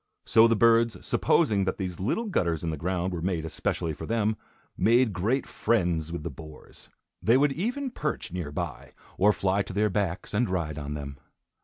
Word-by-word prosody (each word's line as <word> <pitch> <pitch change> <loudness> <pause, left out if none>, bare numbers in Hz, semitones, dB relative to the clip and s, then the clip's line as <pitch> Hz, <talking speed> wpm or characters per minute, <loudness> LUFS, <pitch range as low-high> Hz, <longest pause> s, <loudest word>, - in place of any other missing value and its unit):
So 115 +1 +6
the 115 - +3
birds, 115 +1 +4
supposing 100 -3 +2
that 95 - -1
these 90 -3 -4
little 130 - -1
gutters 85 - 0
in 85 - -1
the - - -2
ground 90 +3 -2
were 85 - -4
made 85 -3 -1
especially 80 0 -2
for - - -8
them, 110 -1 +1 0.4
made 115 +2 +3
great 110 +10 0
friends 85 -8 0
with 85 -3 -5
the - - -4
boars. 75 -1 -13 0.3
They 115 +3 +4
would 145 +1 +3
even 245 - -2
perch 150 - -3
near 85 -5 -4
by, 65 -2 -5 0.3
or 105 +3 +6
fly 100 -1 +1
to 95 - -6
their 105 +1 +1
backs, 95 -2 -2
and 110 +1 +1
ride 80 -5 -2
on 75 0 -5
them. 70 -2 -7
95 Hz, 190 wpm, -27 LUFS, 85-115 Hz, 0.4 s, So